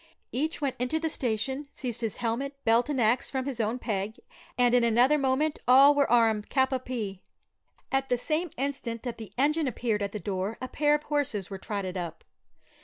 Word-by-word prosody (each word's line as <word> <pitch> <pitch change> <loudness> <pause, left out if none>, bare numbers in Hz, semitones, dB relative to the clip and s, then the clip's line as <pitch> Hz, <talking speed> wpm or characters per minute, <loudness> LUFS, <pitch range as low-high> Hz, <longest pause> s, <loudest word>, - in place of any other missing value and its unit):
Each 310 +6 -2
went 280 -3 -2
into 250 +6 0
the 320 -1 -1
station, 265 +4 -2
seized 245 -3 -4
his 225 -3 -1
helmet, 250 +4 -2
belt, 230 +4 +3
and 285 -3 0
axe, 235 +2 +2
from 265 -1 -2
his 270 -4 -4
own 225 +2 0
peg, 215 -3 -3 0.4
and 245 -1 +4
in 245 -1 +5
another 245 +6 +4
moment 275 +3 +1
all 270 +3 +8
were 285 -1 +2
armed 225 -3 +3
cap 265 -1 +2
a 260 - +1
pie. 225 -7 -5 0.7
At 270 0 0
the 245 - +2
same 315 +7 -1
instant 260 -4 -3
that 240 -2 -5
the 220 - -8
engine 300 +3 +2
appeared 225 -3 -1
at 200 -1 -2
the 210 - -4
door 195 +2 -3
a 255 - -4
pair 295 +3 +2
of 300 - -3
horses 265 -11 -1
were 195 - -5
trotted 195 -3 -4
up. 175 -2 -5
250 Hz, 200 wpm, -28 LUFS, 220-275 Hz, 0.7 s, all